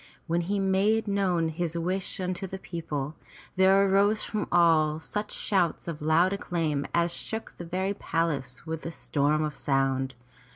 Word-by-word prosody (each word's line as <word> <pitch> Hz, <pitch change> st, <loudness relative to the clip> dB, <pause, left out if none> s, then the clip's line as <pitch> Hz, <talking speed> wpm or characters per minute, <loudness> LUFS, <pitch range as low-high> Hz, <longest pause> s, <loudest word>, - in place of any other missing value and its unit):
When 170 Hz, +1 st, +1 dB
he 200 Hz, +4 st, -1 dB
made 200 Hz, +3 st, +2 dB
known 185 Hz, -5 st, +1 dB
his 170 Hz, +1 st, -2 dB
wish 185 Hz, +4 st, -2 dB
unto 185 Hz, +1 st, -2 dB
the 190 Hz, -, -6 dB
people, 155 Hz, -6 st, -4 dB, 0.4 s
there 190 Hz, +1 st, +5 dB
arose 200 Hz, +2 st, +3 dB
from 215 Hz, -, -3 dB
all 155 Hz, -3 st, +4 dB
such 210 Hz, +6 st, -4 dB
shouts 180 Hz, -5 st, 0 dB
of 160 Hz, -3 st, -5 dB
loud 165 Hz, +5 st, +3 dB
acclaim 160 Hz, -7 st, -1 dB
as 170 Hz, 0 st, +1 dB
shook 220 Hz, +5 st, -4 dB
the 175 Hz, -, -5 dB
very 190 Hz, +3 st, -1 dB
palace 150 Hz, -, -2 dB
with 160 Hz, -1 st, -4 dB
a -, -, -4 dB
storm 150 Hz, -1 st, 0 dB
of 150 Hz, -2 st, -3 dB
sound. 135 Hz, -2 st, 0 dB
170 Hz, 160 wpm, -28 LUFS, 155-195 Hz, 0.4 s, there